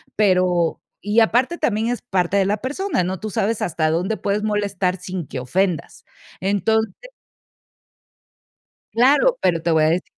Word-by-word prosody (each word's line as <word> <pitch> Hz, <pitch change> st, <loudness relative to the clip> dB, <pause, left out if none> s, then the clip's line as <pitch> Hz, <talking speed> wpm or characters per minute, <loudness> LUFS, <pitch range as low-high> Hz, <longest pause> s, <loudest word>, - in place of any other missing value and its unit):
Pero, 180 Hz, -4 st, +2 dB, 0.2 s
y 210 Hz, +3 st, +2 dB
aparte 245 Hz, +8 st, +2 dB
también 225 Hz, -8 st, 0 dB
es 245 Hz, -, -2 dB
parte 190 Hz, -4 st, 0 dB
de 195 Hz, -, +3 dB
la 205 Hz, +2 st, +1 dB
persona, 290 Hz, -, -2 dB
¿no? 185 Hz, +1 st, -3 dB
Tú 215 Hz, -, -5 dB
sabes 220 Hz, +4 st, -1 dB
hasta 160 Hz, -5 st, 0 dB
dónde 180 Hz, +7 st, 0 dB
puedes 205 Hz, 0 st, -2 dB
molestar 200 Hz, -3 st, 0 dB
sin 180 Hz, -3 st, -6 dB
que 130 Hz, -, -5 dB
ofendas. 175 Hz, +5 st, -2 dB, 0.3 s
Entonces 205 Hz, -, -1 dB, 1.8 s
Claro, 290 Hz, -, +4 dB
pero 165 Hz, -2 st, +1 dB
te 170 Hz, -, 0 dB
voy 160 Hz, -1 st, +3 dB
a -, -, +4 dB
decir. 170 Hz, +3 st, 0 dB
200 Hz, 155 wpm, -21 LUFS, 180-220 Hz, 1.8 s, Claro